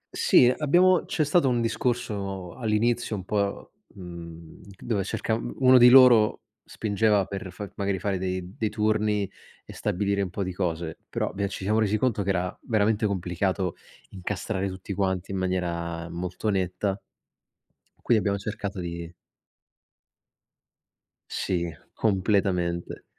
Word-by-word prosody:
Sì, 120 - +5
abbiamo 175 +5 +4
c'è 155 - 0
stato 145 -2 +3
un 120 -1 +1
discorso 105 -6 -2
all'inizio 115 0 0
un 95 -2 -6
po', 100 -1 -2 0.2
mhmm, 85 -3 -10 0.2
dove 105 -5 -1
cerca 110 - -2
uno 125 +3 +4
di 120 +1 +9
loro 125 -4 +7 0.2
spingeva 105 -2 +1
per 95 -2 -6
fa 100 +3 -7
magari 100 -1 0
fare 95 0 -2
dei 95 0 -4
dei 110 -2 -1
turni 105 -1 +1 0.4
e - - -11
stabilire 100 +1 -1
un 95 - -2
po' 100 +2 -3
di 95 -1 -4
cose, 85 -3 -3
però - - -2
bia 100 0 -1
ci 95 - -6
siamo 110 +3 +2
resi 110 0 +2
conto 115 -3 0
che 100 - -2
era 90 -1 -1
veramente 110 -1 +1
complicato 95 -1 -1 0.4
incastrare 95 +1 -3
tutti 95 +1 -6
quanti 95 -1 -1
in 95 - -2
maniera 85 -2 -2
molto 90 +5 -3
netta, 95 +1 -1 1.0
quindi 120 - +3
abbiamo 100 -1 0
cercato 100 -2 -5
di 85 -1 -6 2.2
Sì, 85 -2 -1 0.2
completamente. 95 -4 0
100 Hz, 135 wpm, -26 LUFS, 90-110 Hz, 2.2 s, di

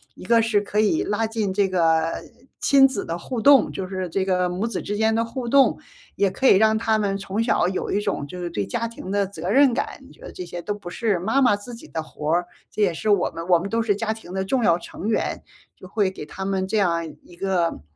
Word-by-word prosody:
一 - - -12
个 230 -1 +4
是 220 -2 +2
可 210 +1 -2
以 215 +10 +2
拉 215 +2 -1
近 220 -3 -2
这 200 0 +2
个 165 -3 +1 0.4
亲 270 -1 +6
子 245 -7 -4
的 165 - -3
互 230 +7 -4
动， 280 -1 +6
就 190 - -4
是 185 -1 -3
这 190 +3 -1
个 180 -1 +1
母 180 +4 -2
子 230 - -3
之 205 - -4
间 220 +1 +2
的 230 +1 +1
互 240 +1 -5
动， 275 +1 +4 0.4
也 200 -2 +2
可 260 +8 +1
以 - - +7
让 220 +2 +4
他 220 -1 +1
们 200 -2 0
从 200 +3 -2
小 230 -6 +2
有 185 0 -3
一 205 - +1
种 200 -8 -2
就 180 +5 -8
是 175 - -3
对 105 -10 -2
家 230 - -2
庭 225 -5 -8
的 200 -1 +1
责 180 -2 -6
任 265 +3 +5
感。 - - -3
你 - - -17
觉 - - -23
得 - - -9
这 365 - -7
些 175 - -7
都 205 - -3
不 205 -4 -9
是 205 -1 0
妈 225 +10 +1
妈 210 -6 +4
自 235 +4 -9
己 230 - -13
的 160 - -3
活 155 -1 -5
儿， 175 +1 +2 0.3
这 - - -3
也 190 -4 +3
是 215 +7 -3
我 200 -3 +3
们 165 0 -6
我 175 -2 +5
们 190 +4 -5
都 230 +2 0
是 215 -3 +1
家 220 0 -1
庭 220 -5 -12
的 190 0 -2
重 245 +5 0
要 170 -4 +3
成 195 +4 -6
员， 220 - -1 0.3
就 185 - -13
会 205 -1 +1
给 190 -5 -8
他 190 +5 -7
们 190 -1 -1
这 220 - 0
样 170 -4 +1 0.2
一 175 - -16
个 180 - -1
200 Hz, 285 characters per minute, -23 LUFS, 180-225 Hz, 0.4 s, 以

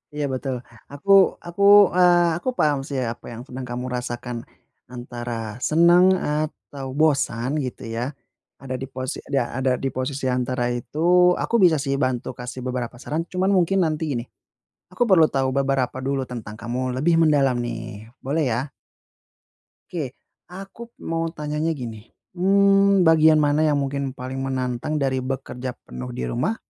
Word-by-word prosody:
Iya, 150 -1 -1
betul. 130 0 -3 0.4
Aku 145 +8 -10 0.4
aku, 175 +3 -6 0.3
eee, 175 -2 +4
aku 255 - -3
paham 145 -2 +3
sih, 140 -2 -3
apa - - -19
yang 115 +1 -7
sedang 130 +1 -7
kamu 125 +1 -4
rasakan, 120 0 -4 0.5
antara 120 -3 -6
senang 170 +3 +6
atau 150 -2 -4
bosan, 140 -3 +1
gitu 125 - -6
ya, 125 +5 -2 0.5
ada 130 -1 -5
di - - -3
posi 130 0 -4 0.2
da 120 -3 0
ada 130 0 +1
di - - +1
posisi 130 +1 -3
antara 125 -1 0
itu. 135 +5 -6 0.4
Aku 235 - -1
bisa 165 -3 +5
sih 135 0 -1
bantu 125 -2 -1
kasih 125 +1 -6
beberapa 125 -1 -3
saran, 155 +4 -3
cuman 185 +1 +1
mungkin 190 +2 +2
nanti 155 +1 -2
gini, 120 -2 -2 0.7
aku 185 - -11
perlu 165 -4 +7
tahu 135 -1 0
beberapa 135 -2 0
dulu 135 0 -1
tentang 110 -4 -8
kamu 125 +2 -3
lebih 165 +5 +2
mendalam, 145 -5 +4
nih. 115 -2 -6 0.2
Boleh, 150 +3 0
ya? 130 +4 -3 1.2
Oke. 145 -7 -4 0.4
Aku 195 +5 -10 0.2
mau 165 0 -1
tanyanya 150 +1 -2
gini, 115 -6 -7 0.2
mmm, 195 0 +4
bagian 160 -1 +6
mana 150 +1 +2
yang 150 -2 +2
mungkin 140 -1 -2
paling 130 0 -7
menantang 130 +3 -2
dari 130 -2 0
bekerja 130 -1 -4 0.2
penuh 125 0 -7
di 120 - -4
rumah, 185 - -1
135 Hz, 155 wpm, -23 LUFS, 125-160 Hz, 1.2 s, perlu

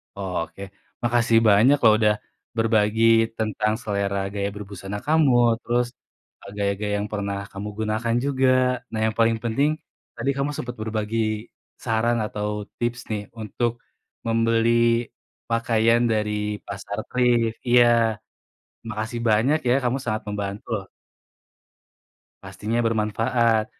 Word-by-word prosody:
Oh, 95 -2 -5
oke. 85 +4 -14 0.4
Makasih 120 -1 +3
banyak 110 +8 +6
loh 110 -2 +7
udah 105 -1 +4 0.4
berbagi 110 0 +2 0.3
tentang 110 -1 0
selera 100 -1 -1 0.2
gaya 100 -1 -1
berbusana 100 -1 -6
kamu 155 -3 +4 0.3
terus, 120 0 0 0.5
eee, 100 - -11
gaya-gaya 100 +1 -1
yang 105 - -4
pernah 100 -1 -2
kamu 100 +2 -6
gunakan 110 +2 0
juga. 135 -2 +2 0.4
Nah, 110 - -3
yang 110 -1 -1
paling 115 0 +3
penting 120 +6 +1 0.5
tadi 135 - -2
kamu 140 +2 0
sempat 125 0 -5
berbagi 110 0 -2 0.7
saran 115 +1 +1
atau 105 0 -3 0.3
tips 120 0 -1
nih 105 -1 -1 0.2
untuk 115 +2 -1 0.5
membeli 115 0 +2 0.8
pakaian 115 0 +2
dari 105 -1 0 0.3
pasar 100 +1 -6
thrift. 120 -2 +2
Iya. 120 0 +7 1.0
Makasih 110 +2 -4
banyak 115 +8 +3
ya, 120 - +4
kamu 125 +2 0
sangat 110 -2 -2
membantu, 100 0 -4
loh. 95 - -10 1.6
Pastinya 115 +3 -3
bermanfaat, 115 0 +1
110 Hz, 120 wpm, -24 LUFS, 105-120 Hz, 1.6 s, loh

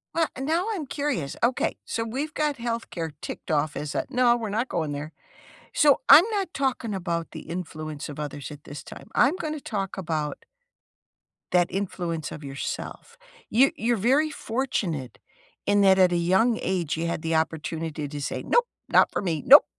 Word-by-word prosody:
Wha 330 -2 +3
and 265 +1 -4
now 335 +6 +1
I'm 340 -9 -3
curious, 265 - -2
okay, 245 +2 +2
so 230 - -2
we've 275 +7 -3
got 300 -3 0
healthcare 230 -9 -3
ticked - - -7
off 150 -1 +1
as 150 -1 -4
a - - 0
"No, 245 -2 +4
we're 220 -3 -4
not 225 +5 -1
going 160 -4 -1
there." 145 +2 -5 0.6
So 290 -3 +5
I'm 330 - +10
not 390 -4 -1
talking 255 -5 -1
about 170 -3 -3
the - - -7
influence 155 -4 -6
of 145 - -7
others 145 -1 -5
at 145 0 -11
this 145 - -8
time. - - -11
I'm 275 +8 +4
gonna 310 -4 -4
talk 195 -7 -3
about 155 -5 -3 1.1
that 175 -1 +4
influence 175 -6 -3
of 150 - -8
yourself. 145 - -6 0.3
You 265 +5 +5
you're 230 -1 0 0.3
fortunate 200 - -2 0.5
in 205 0 +4
that 190 -1 +6
at 185 -1 +6
a 175 - +2
young 190 +7 +3
age, 170 -4 -1
you 170 +1 -1
had 170 - -2
the 165 -1 0
opportunity 160 -1 -2
to 145 0 -6
say, - - -3
"Nope, 480 0 +3 0.2
not - - +5
for - - -1
me, 165 -6 -1
nope, 285 +3 +10
190 Hz, 180 wpm, -26 LUFS, 155-255 Hz, 1.1 s, I'm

